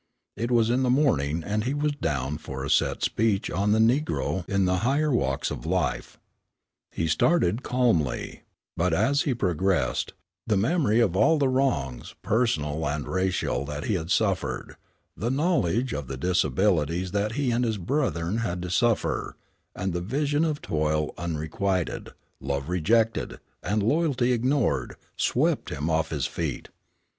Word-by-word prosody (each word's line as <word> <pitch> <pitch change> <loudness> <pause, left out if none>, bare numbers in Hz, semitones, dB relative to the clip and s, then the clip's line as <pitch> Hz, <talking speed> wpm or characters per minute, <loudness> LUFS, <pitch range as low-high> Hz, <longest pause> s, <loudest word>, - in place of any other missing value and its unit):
It 115 +3 -2
was 115 -2 +3
in 125 +2 +2
the 130 - +1
morning, 85 - +2
and 105 +3 -1
he 130 +4 -1
was 150 +1 +1
down 75 - -2
for 65 -3 -6
a - - -2
set - - +2
speech 105 -3 +1
on 100 +4 +1
"The 110 - +4
Negro 115 - +1
in 100 -1 +2
the 90 0 +2
Higher 140 +8 +1
Walks 70 - 0
of - - -5
Life." - - -2 0.7
He 80 - -2
started 110 - +2
calmly, 115 - 0 0.3
but 85 0 +1
as 140 - +2
he 130 - +1
progressed, 90 - 0 0.3
the 105 -3 +2
memory 120 - +2
of 95 -6 +2
all 155 +11 +4
the 140 -2 +2
wrongs, 125 - -1
personal 80 -10 0
and 75 0 -3
racial 95 -7 0
that 75 +1 -5
he - - 0
had 80 -3 -2
suffered; - - 0 0.4
the 115 +6 -2
knowledge 130 - +1
of 70 -2 -4
the 65 - -5
disabilities 90 +2 +1
that 105 +2 -1
he 135 -1 0
and 120 +1 +1
his 110 -3 0
brethren 100 - -1
had 90 -6 -2
to 90 - -4
suffer, 115 +3 0 0.4
and 95 0 -2
the 85 - -2
vision 145 - 0
of 155 -3 -1
toil 75 0 0
unrequited, 85 +3 -2 0.3
love 70 +2 -3
rejected, 110 +6 +1 0.2
and 105 0 0
loyalty 135 -1 +2
ignored, 125 +2 0 0.2
swept - - +1
him 75 +4 -2
off 80 0 +1
his 75 -3 -2
feet. 80 -7 -4
100 Hz, 155 wpm, -26 LUFS, 80-125 Hz, 0.7 s, The